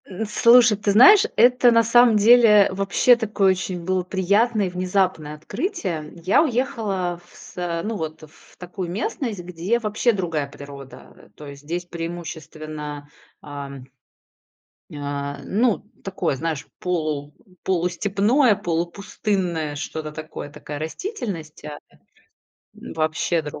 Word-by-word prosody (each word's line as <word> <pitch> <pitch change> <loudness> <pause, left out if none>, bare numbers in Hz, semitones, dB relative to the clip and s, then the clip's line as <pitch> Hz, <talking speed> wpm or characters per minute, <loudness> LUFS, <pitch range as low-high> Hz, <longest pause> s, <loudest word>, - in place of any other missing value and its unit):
Н 195 +3 -5
слушай, 230 +1 +5
ты 205 0 0
знаешь, 385 - +8
это 245 +1 +5
на 230 0 +5
самом 235 0 +5
деле 210 -2 +6
вообще 195 +6 +3
такое 210 -4 +1
очень 185 -1 -4
было 185 0 0
приятное 200 +4 +1
и - - -3
внезапное 180 -4 -1
открытие, 230 - -3
м. 150 0 -11
Я 175 - +2
уехала 220 - -2
в - - -21
са 175 -2 -5
ну 225 +1 -3
вот, 160 -1 -6
э, - - -11
в 150 - -22
такую 180 0 -6
местность, 215 +3 -3
где 180 +6 -1
вообще 220 +2 +1
другая 170 -8 -2
природа, 140 -2 -12
э, - - -19
то 150 - -11
есть 140 -1 -10
здесь 175 +4 -4
преимущественно, 155 -3 -7 0.3
ам 140 -2 -8 1.1
а, 140 0 -4
ну, 220 0 +1 0.2
такое, 180 -6 -2
знаешь, 155 0 -4
полу 155 -5 -2 0.3
полустепное, 200 - +2
полупустынное, 175 -3 -2
что-то 155 +1 -5
такое, 155 -1 -8
такая 145 0 -8
растительност 165 - -6
да 150 -1 -7 1.0
вообще 160 +1 -2
другая, 150 -1 -8
180 Hz, 130 wpm, -22 LUFS, 155-210 Hz, 1.1 s, знаешь